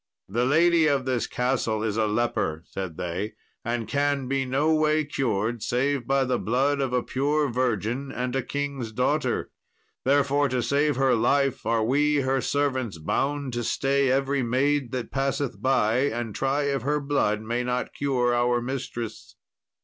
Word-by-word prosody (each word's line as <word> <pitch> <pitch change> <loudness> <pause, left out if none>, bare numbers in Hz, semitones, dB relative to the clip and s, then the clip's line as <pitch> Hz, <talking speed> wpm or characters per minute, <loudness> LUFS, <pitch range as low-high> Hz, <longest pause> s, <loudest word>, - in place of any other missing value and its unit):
"The 120 +6 0
lady 165 +3 +4
of 140 -3 +1
this 130 -3 0
castle 125 -4 -1
is 110 -2 -1
a 110 -1 +1
leper," 105 -8 -1
said 95 -5 -6
they, 90 +5 -3 0.3
"and 120 -1 -2
can 140 -2 0
be 135 0 0
no 145 +5 +2
way 155 0 +2
cured 115 -5 -1
save 130 +2 0
by 135 0 +3
the 130 -1 0
blood 135 +5 +1
of 135 -2 -1
a 125 -1 +1
pure 145 +2 0
virgin 125 +2 -1
and 125 +1 -3
a 135 - +1
king's 140 -3 -4
daughter; 125 +2 0 0.5
therefore 140 +1 +2
to 125 -1 0
save 145 0 +1
her 135 0 +3
life 135 +3 +1
are 115 -1 +2
we 145 +4 +2
her 135 0 +1
servants 130 -9 -1
bound 140 - -1
to 120 0 -2
stay 135 +3 +1
every 135 +1 +1
maid 130 +2 +1
that 125 -3 -4
passeth 135 0 -2
by, 120 -4 +2
and 115 -3 -4
try 135 +4 0
if 140 -2 0
her 145 +4 0
blood 140 -7 0
may 120 +2 -1
not 125 0 -2
cure 125 -4 +1
our 120 0 +2
mistress." 115 -6 -5
130 Hz, 165 wpm, -25 LUFS, 120-140 Hz, 0.5 s, lady